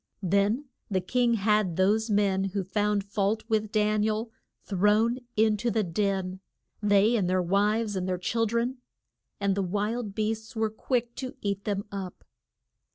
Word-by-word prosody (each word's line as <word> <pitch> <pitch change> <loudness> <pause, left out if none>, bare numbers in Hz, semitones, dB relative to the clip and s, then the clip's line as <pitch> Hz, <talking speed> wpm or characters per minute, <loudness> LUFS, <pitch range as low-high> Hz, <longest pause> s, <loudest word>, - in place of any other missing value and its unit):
Then 200 - +2 0.2
the 190 -2 +1
king 235 +5 +1
had 210 -4 +2
those 210 +5 +2
men 200 -2 +2
who 195 0 -2
found 205 +2 0
fault 205 +2 -1
with 215 -2 0
Dan 215 -1 +2
i - - +2
el, 220 +1 -2 0.3
thrown 210 +5 +2 0.2
in 215 0 +3
to 235 +3 -1
the 220 -1 +1
den 190 0 -1 0.4
they 205 +2 +4
and 190 -6 +1
their 185 0 +2
wives, 205 +4 +1
and 185 -1 -2
their 180 - 0
chil 225 +5 0
dren 235 +4 -1 0.6
and 200 -1 +1
the 200 - 0
wild 205 +3 -2
beasts 220 +2 -2
were 220 -1 0
quick 240 +1 -1
to 255 -1 -5
eat 200 -1 -2
them 200 -1 -1
up. 195 -2 -6
210 Hz, 165 wpm, -28 LUFS, 195-220 Hz, 0.6 s, they